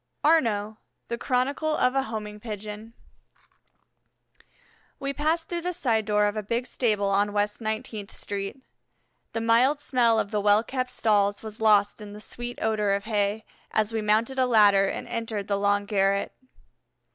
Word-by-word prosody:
ARNAUX 220 -9 +2 0.3
THE 235 - -2
CHRONICLE 280 +5 0
OF 255 - +2
A 270 - +2
HOMING 210 -4 -6
PIGEON 210 0 -7 2.1
We 275 0 -3
passed 320 +3 0
through 345 -1 -3
the 360 +1 -2
side 230 -10 0
door 210 0 +2
of 205 0 0
a 215 - -2
big 230 +4 -2
stable 210 -6 0
on 205 +1 +1
West 205 +2 -1
Nineteenth 215 -1 -4
Street. 200 +6 -5 0.7
The 225 - -2
mild 240 +6 +3
smell 240 -6 +2
of 200 - -2
the 210 - 0
well 205 +2 +4
kept 255 +1 -3
stalls 205 -4 +1
was 220 0 -8
lost 210 -1 +3
in 205 -1 -9
the 210 - -9
sweet 240 +3 -7
odor 210 -2 +1
of 200 - -4
hay, 210 0 -1 0.2
as 215 +1 0
we 220 - -1
mounted 220 +5 +1
a 255 - +3
ladder 205 -4 +5
and - - -4
entered 225 -3 -4
the 200 -1 0
long 205 0 +1
garret. 200 -1 +1
215 Hz, 165 wpm, -26 LUFS, 205-245 Hz, 2.1 s, ladder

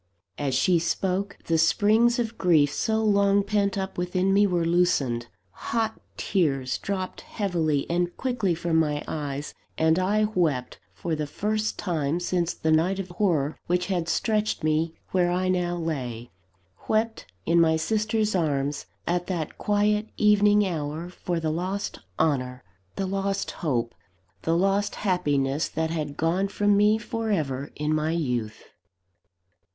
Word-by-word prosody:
As 140 -3 0
she 170 +6 +3
spoke, 190 +4 -1
the 165 -1 +1
springs 215 +8 +4
of 235 -2 0
the - - -19
grief 155 -9 +3
so 220 +5 0
long 200 -1 +3
pent 200 -1 0
up 190 -2 -3
within 185 +2 +1
me 205 +1 +5
were 175 -3 0
loosened; 150 -9 +1 0.2
hot 220 - -2 0.2
tears 140 -9 0
dropped 190 -2 -4
heavily 165 -8 -1
and 175 +1 -1
quickly 230 -9 0
from 165 0 0
my 150 -2 +1
eyes; 145 -1 -4 0.2
and 160 +2 +3
I 205 +3 +2
wept 165 -12 0
for 170 - -4
the 150 -1 -3
first 215 +7 -1
time 160 -3 -1
since 175 -1 0
the 160 - 0
night 170 +5 +3
of 190 -1 -5
horror 170 -6 0
which 180 +1 +1
had 170 -2 -1
stretched 215 -3 0
me 155 +1 +1 0.2
where 180 -2 +2
I 185 +1 0
now 175 -1 0
lay 125 -8 -4 0.6
wept 220 +1 0 0.2
in 170 0 +4
my 160 -1 +4
sister's 215 +4 0
arms, 145 -5 -1 0.2
at 175 0 -1
that 170 -5 -4
quiet 210 +1 +1
evening 210 0 +4
hour, 160 -1 -3
for 175 -1 -3
the 160 -1 -1
lost 185 +5 -3 0.2
honour, 125 -6 0 0.3
the 195 - -2
lost 195 +1 -1
hope, 120 -7 -2 0.5
the 165 +1 +1
lost 195 +3 +1
happiness 145 -7 0
that 160 0 -2
had 150 -3 -3
gone 175 +5 +1
from 205 +1 +2
me 210 +2 +4
for 225 0 -4
ever 145 -8 -1
in 150 +1 -1
my 155 +1 0
youth! 125 -9 -2
175 Hz, 150 wpm, -26 LUFS, 155-200 Hz, 0.6 s, me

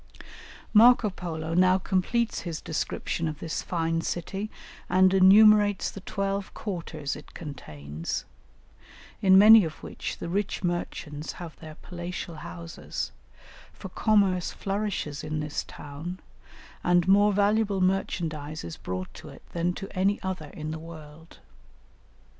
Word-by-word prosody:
Marco 230 -1 +7
Polo 165 -3 -5
now 185 +2 +5
completes 190 +5 0
his 165 -3 -5
description 165 +1 -2
of 155 -1 -4
this 160 0 -3
fine 165 -2 -1
city 195 +5 -3 0.4
and 185 +1 +5
enumerates 205 +1 +6
the 195 - -9
twelve 195 0 -2
quarters 165 -7 -4
it 150 - -13
contains, 80 - -6 1.0
in 190 -1 +7
many 215 +2 +9
of 160 -2 -6
which - - -5
the - - -6
rich 195 +3 -2
merchants 160 -3 -3
have 170 -3 -9
their 155 -1 -10
palatial 175 -1 -6
houses, 85 - -6 0.6
for 190 - -9
commerce 195 -3 +2
flourishes 195 -7 -3
in 155 0 -3
this 150 -1 -3
town, 155 +6 -8 0.6
and 175 0 +3
more 205 +2 +5
valuable 205 0 +2
merchandise 165 -5 -1
is 85 - -7
brought 90 0 -5
to - - -11
it - - -13
than 175 +1 0
to 195 +2 -6
any 195 +2 +2
other 185 -5 -4
in 155 +1 -6
the 160 - -5
world. 160 0 -12
175 Hz, 130 wpm, -27 LUFS, 155-195 Hz, 1.0 s, many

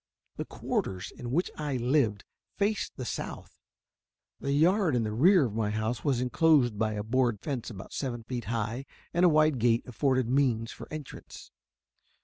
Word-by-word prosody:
The - - -3
quarters 95 -1 -3
in 120 - -6
which 165 +9 0
I 145 -3 -1
lived 120 -5 +1 0.3
faced 200 -1 0
the 130 - -5
south. - - -6 0.8
The 140 - -2
yard 165 +2 +3
in 120 - +1
the 105 - -2
rear 170 - +5
of 110 - -4
my 110 -1 0
house 110 +2 -2
was 135 -5 +1
inclosed 125 -3 +3
by 110 -1 +1
a 105 -1 -3
board 120 -1 +1
fence 135 -3 -4
about 95 -5 -9
seven 120 -4 -3
feet 120 0 -5
high, 115 +4 -3 0.3
and 175 - +2
a - - +7
wide 155 -3 +3
gate 115 +1 +3
afforded 130 0 +1
means 120 -4 +1
for - - -11
entrance. 155 -3 -9
125 Hz, 170 wpm, -29 LUFS, 115-145 Hz, 0.8 s, a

